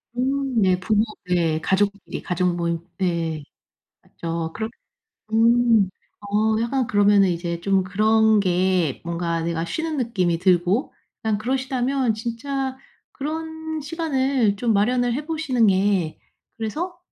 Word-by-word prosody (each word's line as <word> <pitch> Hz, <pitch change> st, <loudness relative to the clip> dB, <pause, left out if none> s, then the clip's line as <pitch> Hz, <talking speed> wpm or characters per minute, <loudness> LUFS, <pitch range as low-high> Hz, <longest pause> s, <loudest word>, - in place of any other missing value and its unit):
음 265 Hz, -1 st, 0 dB
네. 185 Hz, -2 st, +3 dB
부모 210 Hz, +3 st, +2 dB, 0.3 s
예 165 Hz, -3 st, +2 dB
가족끼리 200 Hz, +2 st, -1 dB
가족 180 Hz, 0 st, 0 dB
모임 170 Hz, -1 st, -1 dB, 0.2 s
네. 165 Hz, -4 st, -1 dB, 0.6 s
맞죠. 165 Hz, -1 st, -5 dB
그럼 220 Hz, 0 st, -3 dB, 0.6 s
음. 230 Hz, -2 st, +4 dB, 0.3 s
어 210 Hz, +2 st, +1 dB
약간 255 Hz, +2 st, 0 dB
그러면은 205 Hz, -2 st, +4 dB
이제 170 Hz, -1 st, -2 dB
좀 195 Hz, +1 st, +2 dB
그런 215 Hz, +3 st, +3 dB
게 180 Hz, -5 st, +1 dB
뭔가 170 Hz, -1 st, -2 dB
내가 165 Hz, 0 st, -2 dB
쉬는 320 Hz, -, -3 dB
느낌이 185 Hz, -9 st, 0 dB
들고 185 Hz, -, +2 dB, 0.3 s
그냥 220 Hz, -2 st, 0 dB
그러시다면 260 Hz, 0 st, 0 dB
진짜 260 Hz, +4 st, -3 dB, 0.4 s
그런 320 Hz, +1 st, -5 dB
시간을 275 Hz, -8 st, 0 dB
좀 230 Hz, +2 st, +1 dB
마련을 240 Hz, +4 st, +2 dB
해 290 Hz, +3 st, -4 dB
보시는 310 Hz, -8 st, +1 dB
게 190 Hz, -4 st, +1 dB, 0.4 s
그래서 325 Hz, -, -4 dB
215 Hz, 240 characters per minute, -23 LUFS, 180-255 Hz, 0.6 s, 음